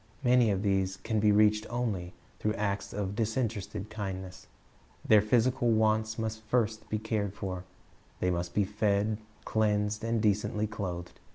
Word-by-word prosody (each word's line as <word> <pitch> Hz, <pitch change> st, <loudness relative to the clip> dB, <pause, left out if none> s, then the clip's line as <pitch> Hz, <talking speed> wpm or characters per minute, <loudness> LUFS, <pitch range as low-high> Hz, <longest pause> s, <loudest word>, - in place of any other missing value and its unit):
Many 125 Hz, -2 st, +5 dB
of 100 Hz, -1 st, 0 dB
these 95 Hz, -1 st, +1 dB
can 110 Hz, +2 st, -1 dB
be 105 Hz, 0 st, +4 dB
reached 105 Hz, +1 st, +4 dB
only 100 Hz, -8 st, -2 dB, 0.2 s
through 110 Hz, +1 st, 0 dB
acts 100 Hz, -1 st, -2 dB
of 100 Hz, -1 st, -3 dB
disinterested 110 Hz, -2 st, -2 dB
kindness. 95 Hz, -3 st, -6 dB, 0.6 s
Their 110 Hz, -1 st, +7 dB
physical 120 Hz, +3 st, +2 dB
wants 110 Hz, 0 st, +2 dB
must 110 Hz, -1 st, -3 dB
first 110 Hz, -1 st, -1 dB
be 110 Hz, -, 0 dB
cared 105 Hz, -2 st, -2 dB
for. 95 Hz, -3 st, -5 dB, 0.5 s
They 90 Hz, -, +1 dB
must 85 Hz, 0 st, -3 dB
be 105 Hz, -, +4 dB
fed, 105 Hz, +1 st, 0 dB, 0.3 s
cleansed, 105 Hz, 0 st, +1 dB
and 115 Hz, 0 st, +1 dB
decently 105 Hz, 0 st, +1 dB
clothed. 90 Hz, -5 st, -5 dB
105 Hz, 150 wpm, -30 LUFS, 100-110 Hz, 0.6 s, Their